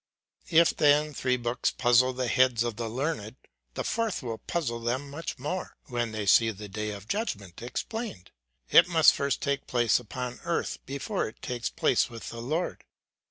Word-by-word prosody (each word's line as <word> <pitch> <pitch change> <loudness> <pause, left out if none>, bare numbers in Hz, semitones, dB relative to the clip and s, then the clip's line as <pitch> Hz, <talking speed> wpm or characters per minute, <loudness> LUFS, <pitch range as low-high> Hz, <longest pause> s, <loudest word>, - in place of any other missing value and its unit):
If 165 0 +5
then 150 +1 +4
three 125 -1 0
books 120 0 0
puzzle 125 +1 +4
the 125 0 -2
heads 125 -2 +3
of 120 -2 -2
the 115 0 -4
learned, 125 -3 -3 0.4
the - - -2
fourth 225 -8 -1
will 115 -2 -4
puzzle 130 -9 -2
them 125 +4 -2
much 160 +2 -5
more, 150 +8 -4
when 120 -2 -1
they 110 -1 -3
see 115 +3 +5
the 105 -1 -7
day 105 +2 -4
of 100 0 -7
judgment 100 - -3
explained. 125 - -5 0.4
It - - +8
must 165 -3 +6
first 140 -1 -1
take 140 -1 -1
place 120 -2 +3
upon 125 +1 -6
earth, 170 0 -1
before 140 0 -2
it 110 - -11
takes 120 -2 -2
place 165 -5 +2
with 115 -2 -8
the 115 - -7
Lord. 155 +9 -2
125 Hz, 175 wpm, -28 LUFS, 115-150 Hz, 0.4 s, It